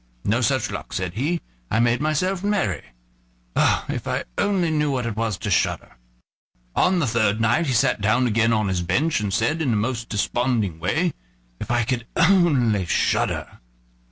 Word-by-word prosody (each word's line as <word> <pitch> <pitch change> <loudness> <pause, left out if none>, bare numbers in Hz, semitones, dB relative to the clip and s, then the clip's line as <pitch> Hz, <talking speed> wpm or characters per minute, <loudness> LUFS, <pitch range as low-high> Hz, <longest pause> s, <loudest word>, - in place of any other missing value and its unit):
"No 110 +5 +1
such 130 +1 0
luck," - - -7
said 90 -2 -3
he; 155 - -1 0.3
"I - - +1
made 120 +2 +2
myself 175 +5 0
merry. 195 - 0 0.7
Oh! - - +2
if - - -4
I - - -1
only 185 -5 +1
knew 150 -1 +1
what 130 -3 -1
it 115 -3 -3
was 110 -3 -1
to 105 0 -4
shudder!" 85 - 0 0.8
On 185 0 +3
the 165 - +1
third 110 -3 +1
night 120 +9 +2
he 130 - 0
sat 115 -3 +2
down 110 +5 +2
again 115 0 +2
on 110 -2 +1
his 95 -2 -1
bench, 150 - +1
and 105 -2 -2
said, 120 - 0
in 145 - 0
the 110 - +2
most 115 +2 -2
desponding 110 -4 -1
way: 155 - 0 0.5
"If - - -6
I 120 -1 +2
could 120 0 -2
only 145 - +3
shudder!" - - 0
120 Hz, 180 wpm, -23 LUFS, 110-155 Hz, 0.8 s, On